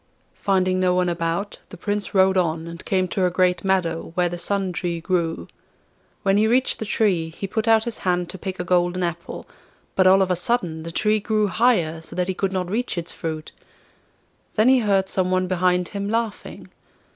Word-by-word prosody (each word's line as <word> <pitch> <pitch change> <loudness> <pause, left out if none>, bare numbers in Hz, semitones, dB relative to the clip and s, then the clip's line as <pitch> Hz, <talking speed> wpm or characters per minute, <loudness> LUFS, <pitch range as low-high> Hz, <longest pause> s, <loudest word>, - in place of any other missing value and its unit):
Finding 185 -2 +2
no 180 -1 +2
one 180 -1 +2
about, 170 +4 -2
the - - -10
Prince 205 -1 -3
rode 190 0 +5
on, 165 -3 0
and 170 +1 -8
came 185 -1 +1
to 185 -2 +1
a - - +1
great 180 0 +1
meadow, 170 -4 0
where 180 -1 +2
the 175 0 -6
Sun 195 +1 0
Tree 170 -1 -2
grew. 165 -1 -1 0.8
When 195 0 +3
he 215 +1 +3
reached 250 +3 +2
the 220 - -3
tree 185 -7 +1
he 165 +4 -6
put 220 +3 -2
out 225 -1 +5
his 235 -1 -4
hand 180 -1 0
to 190 - -9
pick 185 0 -5
a - - -1
golden 175 0 +1
apple; 170 -1 -5 0.5
but 185 -1 +4
all 190 +1 +6
of 185 - -1
a - - +3
sudden 175 -4 -1
the 165 +1 -7
tree 215 +5 +1
grew 215 0 +1
higher, 185 -6 +1
so 160 - -10
that 180 -1 0
he 190 - -1
could 195 +1 -1
not 185 -2 -2
reach 220 +2 -2
its 170 -1 -3
fruit. 155 -1 -5 1.0
Then 220 +3 +4
he 260 -1 +5
heard 200 -4 +2
some 185 -1 0
one 185 0 +1
behind 180 -1 +1
him 200 0 -4
laughing. 225 -1 -3
185 Hz, 205 wpm, -23 LUFS, 175-200 Hz, 1.0 s, all